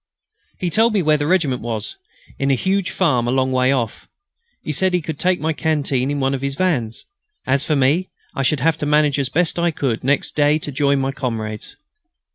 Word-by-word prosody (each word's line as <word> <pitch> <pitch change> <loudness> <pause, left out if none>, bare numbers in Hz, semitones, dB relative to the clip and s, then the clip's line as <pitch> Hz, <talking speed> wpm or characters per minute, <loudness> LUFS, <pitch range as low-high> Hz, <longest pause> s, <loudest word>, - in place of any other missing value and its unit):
He 180 -2 -2
told 225 +5 +3
me 195 - +2
where 155 -1 +3
the 145 0 -2
regiment 155 -8 +1
was, 110 -3 -4 0.4
in 135 - 0
a 135 - +4
huge 190 +6 0
farm 130 -10 +1
a - - +1
long 130 0 +1
way 130 0 +2
off. 120 -5 -2 0.6
He - - -3
said 185 +5 +2
he 180 - +1
could 155 -1 -5
take 185 0 +1
my 160 +1 -1
canteen 145 -5 0
in 145 0 -1
one 135 0 +1
of 135 - -3
his 140 0 -3
vans. 140 -10 -1 0.4
As 135 +1 +1
for 155 - 0
me, 145 +7 +2 0.2
I - - -2
should 135 0 +1
have 160 +1 +1
to 150 - -2
manage 150 -1 +3
as 135 -2 -1
best 170 +4 +1
I 170 0 +2
could 135 -7 -2
next 140 +2 0
day 150 0 +3
to 150 -1 -6
join 140 0 +1
my 135 0 -1
comrades. 115 -6 -5
145 Hz, 220 wpm, -20 LUFS, 130-160 Hz, 0.6 s, a